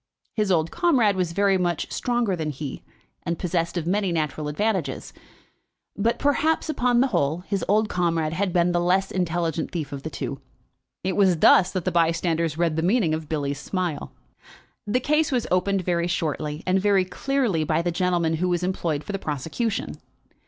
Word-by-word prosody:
His 210 -4 0
old 165 -2 +2
comrade 260 - +3
was 180 -3 -1
very 195 +1 +2
much 175 -3 -1
stronger 240 -5 0
than 160 -3 -3
he, 145 -1 -6 0.4
and 170 0 -3
possessed 170 -1 -1
of 165 - -2
many 195 +1 0
natural 155 -2 -2
advantages; 165 -3 -2 0.8
but, 225 +4 +1
perhaps, 310 +3 +1
upon 245 -5 +2
the 270 - +3
whole, 165 - 0
his 195 +1 -3
old 215 +2 +3
comrade 165 -4 0
had 190 +2 0
been 175 0 +2
the 175 - +1
less 185 +2 +1
intelligent 170 -3 -1
thief 155 -5 -4
of 140 -1 -5
the 160 - -5
two. 140 -3 -5 0.6
It 185 -1 -1
was 190 -4 +4
thus 185 +3 +6
that 185 -3 -2
the 185 - +1
bystanders 165 -1 +1
read 165 -2 +1
the - - +1
meaning 185 -2 +2
of 155 -1 -4
Billy's 145 -2 -2
smile. 175 -3 -3 0.8
The 220 +5 +2
case 300 +3 +1
was 250 -3 0
opened 185 +1 +1
very 170 -1 0
shortly 155 -2 -2
and 185 +1 +2
very 200 -2 +3
clearly 225 - 0
by 155 +2 0
the 175 - 0
gentleman 170 -2 +1
who 180 +3 0
was 175 0 0
employed 170 -5 -1
for - - -6
the 195 - -3
prosecution. 165 - -3
175 Hz, 180 wpm, -24 LUFS, 160-200 Hz, 0.8 s, thus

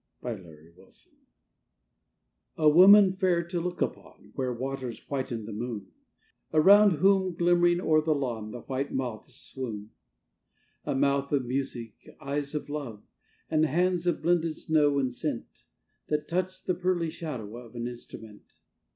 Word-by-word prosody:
A 125 - -3
STUDY 95 -6 -11
IN 80 +2 -17
GRAY 95 +2 -20 1.7
A 155 -2 +5
woman, 190 +4 +8
fair 185 -3 +1
to 170 +1 -3
look 180 +1 -1
upon, - - -8
Where 130 -1 -2
waters 130 -1 -4
whiten 130 -4 -3
with - - -9
the 110 - -7
moon; 105 -3 -5 0.6
Around 200 +6 +7
whom, 190 +2 +2
glimmering 175 0 +3
o'er 155 -3 +3
the 155 0 +1
lawn, 120 -6 -3
The 120 +2 -8
white 135 +1 -3
moths 125 0 -4
swoon. 110 -6 -6 0.9
A - - -1
mouth 140 0 +1
of 140 -3 +1
music; 120 -3 -3 0.3
eyes 140 0 -3
of 150 - -3
love; 140 -8 -6 0.5
And 155 0 +3
hands 180 +3 +1
of 175 - 0
blended 165 -1 +1
snow 150 -3 +2
and 130 -3 0
scent, - - -5 0.4
That 150 0 -1
touch 185 +2 -2
the 185 - 0
pearly 180 -3 -1
shadow 125 -10 -6
of 120 0 -12
An 120 0 -3
instrument. 110 -3 -11
140 Hz, 150 wpm, -28 LUFS, 120-175 Hz, 1.7 s, woman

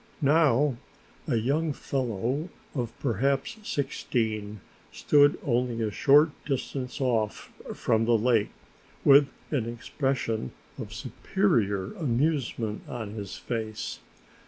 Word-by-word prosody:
Now 145 -3 +4 0.5
a 135 - +1
young 145 +7 +1
fellow 130 - -2 0.2
of 120 -5 -2
perhaps 135 - 0
sixteen 110 - -2 0.3
stood 145 -1 +4
only 120 -2 0
a 110 - -1
short 145 +8 +5
distance 130 -1 -3
off 115 -5 -1 0.2
from 110 0 +1
the 115 0 +4
lake 115 -2 +2 0.6
with 140 0 +8 0.2
an 120 -6 0
expression 120 - -2 0.3
of - - -6
superior 100 -3 0
amusement 130 - -1
on 110 -4 -5
his 105 -3 -6
face. 110 -3 -4
125 Hz, 105 wpm, -27 LUFS, 110-140 Hz, 0.6 s, with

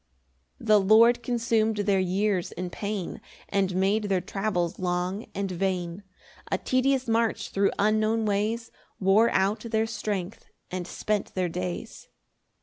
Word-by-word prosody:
3 - - -12
The 215 -1 +6
Lord 230 +5 +6
consum'd 230 -2 +1
their 195 -2 +3
years 185 0 0
in 180 0 -5
pain, 200 -3 -4 0.3
And 195 -2 0
made 200 +3 +2
their 195 -2 +1
travels 180 -3 -2
long 180 +3 -2
and 195 -1 -2
vain; 180 0 -2 0.5
A - - +2
tedious 260 0 +1
march 225 -1 0
thro' 195 0 +2
unknown 215 +2 +2
ways 215 +3 -1 0.3
Wore 205 +4 +4
out 195 +3 +1
their 220 0 0
strength 210 -3 -4 0.2
and 180 -1 -4
spent 210 +1 -2
their 185 -2 0
days. 90 - -5
200 Hz, 140 wpm, -27 LUFS, 185-220 Hz, 0.5 s, The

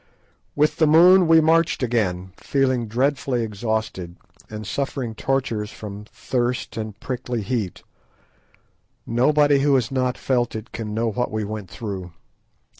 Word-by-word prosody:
With 150 +1 +2
the 155 - +4
moon 175 +4 +7
we 165 0 +6
marched 160 -2 +2
again, 95 -7 -1
feeling 130 -4 0
dreadfully 130 +1 0
exhausted, 105 -5 -3 0.3
and 110 0 -7
suffering 135 -1 -3
tortures 115 -4 -1
from 105 -1 -8
thirst 120 +2 -2
and 110 -2 -6
prickly 125 -4 -4
heat. 105 -4 -3 1.2
Nobody 145 +4 +3
who 140 0 +3
has 125 -3 0
not 130 -1 0
felt 120 -3 0
it 110 +1 -7
can 105 -2 -5
know 115 0 0
what 125 +3 -1
we 110 0 -2
went 105 -2 -6
through. 95 -6 -6
120 Hz, 135 wpm, -22 LUFS, 110-135 Hz, 1.2 s, moon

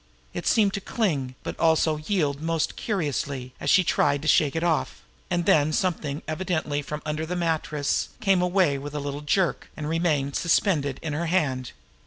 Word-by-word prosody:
It - - -4
seemed 205 -3 +3
to 200 - -3
cling, 145 - -1
but - - -6
also 160 -1 +3
to 155 +7 -9
yield 150 -7 +1
most 165 -1 -1
curiously, 140 - -2
as - - -2
she 185 - +6
tried 145 -3 +1
to - - -3
shake 150 0 +4
it 165 - -1
off; 165 -3 0 0.3
and 175 -2 0
then 150 -1 +4
something, 155 -4 -1
evidently 160 -3 -1
from 150 +2 -6
under 155 +1 -2
the 170 +3 -3
mattress, 155 -4 -1
came 195 -4 +3
away 180 -6 +2
with 145 +1 -7
a - - -1
little 145 0 -4
jerk, 165 0 0
and 150 - -4
remained, 155 -4 0
suspended, 155 -5 +1
in 155 -2 -3
her 165 +3 -2
hand. 140 -8 0
155 Hz, 185 wpm, -25 LUFS, 145-175 Hz, 0.3 s, she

